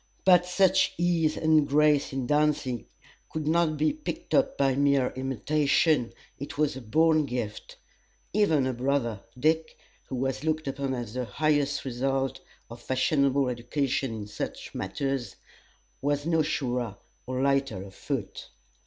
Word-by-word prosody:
But 180 Hz, -1 st, +6 dB
such 190 Hz, +1 st, +3 dB
ease 170 Hz, -3 st, +1 dB
and 155 Hz, -2 st, +3 dB
grace 150 Hz, 0 st, +3 dB
in 135 Hz, -2 st, -2 dB
dancing 145 Hz, -4 st, 0 dB, 0.4 s
could 155 Hz, -1 st, -4 dB
not 160 Hz, -1 st, +2 dB
be 155 Hz, +1 st, +2 dB
picked 310 Hz, +2 st, -6 dB
up 275 Hz, -, +2 dB
by 135 Hz, -1 st, +3 dB
mere 140 Hz, -2 st, +2 dB
imitation 135 Hz, +1 st, +1 dB, 0.3 s
it 140 Hz, -, -7 dB
was 150 Hz, -2 st, +1 dB
a 130 Hz, -, -7 dB
born 155 Hz, +5 st, +3 dB
gift. 120 Hz, -4 st, -5 dB, 0.6 s
Even 160 Hz, -10 st, +3 dB
her 130 Hz, -, -1 dB
brother 125 Hz, -4 st, -1 dB, 0.2 s
Dick, 160 Hz, +3 st, +1 dB, 0.3 s
who 130 Hz, -, -5 dB
was 130 Hz, +1 st, -2 dB
looked 155 Hz, -1 st, -1 dB
upon 135 Hz, -1 st, -2 dB
as 120 Hz, -3 st, -5 dB
the 125 Hz, 0 st, -2 dB
highest 145 Hz, +1 st, 0 dB
result 135 Hz, +1 st, -1 dB, 0.3 s
of 115 Hz, +1 st, -11 dB
fashionable 135 Hz, +1 st, +2 dB
education 125 Hz, +2 st, -1 dB
in 110 Hz, -2 st, -5 dB
such 105 Hz, -, -6 dB
matters, 135 Hz, +6 st, -3 dB, 0.7 s
was 145 Hz, +1 st, 0 dB
not 160 Hz, -2 st, +2 dB
surer 125 Hz, -8 st, -2 dB, 0.3 s
or 130 Hz, +1 st, -1 dB
lighter 135 Hz, -8 st, +1 dB
of 95 Hz, -1 st, -12 dB
foot. -, -, -5 dB
140 Hz, 145 wpm, -27 LUFS, 130-155 Hz, 0.7 s, But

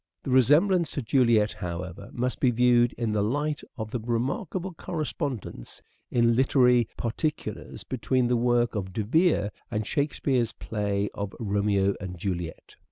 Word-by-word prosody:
The 135 Hz, -, -3 dB
resemblance 155 Hz, -, +4 dB
to 140 Hz, -, -3 dB
Juliet, 115 Hz, -3 st, +3 dB
however, 90 Hz, +3 st, -6 dB
must 125 Hz, +1 st, -2 dB
be 130 Hz, -, +4 dB
viewed 120 Hz, 0 st, +4 dB
in 115 Hz, -2 st, -2 dB
the 105 Hz, -1 st, +1 dB
light 145 Hz, +8 st, -1 dB, 0.2 s
of 110 Hz, -2 st, -5 dB
the 125 Hz, -, -2 dB
remarkable 135 Hz, -, -2 dB
correspondence 145 Hz, -, -5 dB, 0.3 s
in 115 Hz, -1 st, +3 dB
literary 125 Hz, -2 st, +4 dB
particulars 150 Hz, +6 st, -3 dB
between 130 Hz, 0 st, 0 dB
the 125 Hz, -, +2 dB
work 120 Hz, 0 st, +2 dB
of 95 Hz, -4 st, -4 dB
De 110 Hz, -, -1 dB
Vere 155 Hz, -, +2 dB, 0.2 s
and 110 Hz, -1 st, -2 dB
Shakespeare's 135 Hz, -4 st, 0 dB
play 100 Hz, -2 st, -2 dB
of 100 Hz, 0 st, -5 dB
" -, -, -30 dB
Romeo 100 Hz, -2 st, +1 dB
and 90 Hz, -2 st, -6 dB
Juliet." 85 Hz, -2 st, -5 dB
120 Hz, 150 wpm, -27 LUFS, 105-135 Hz, 0.3 s, resemblance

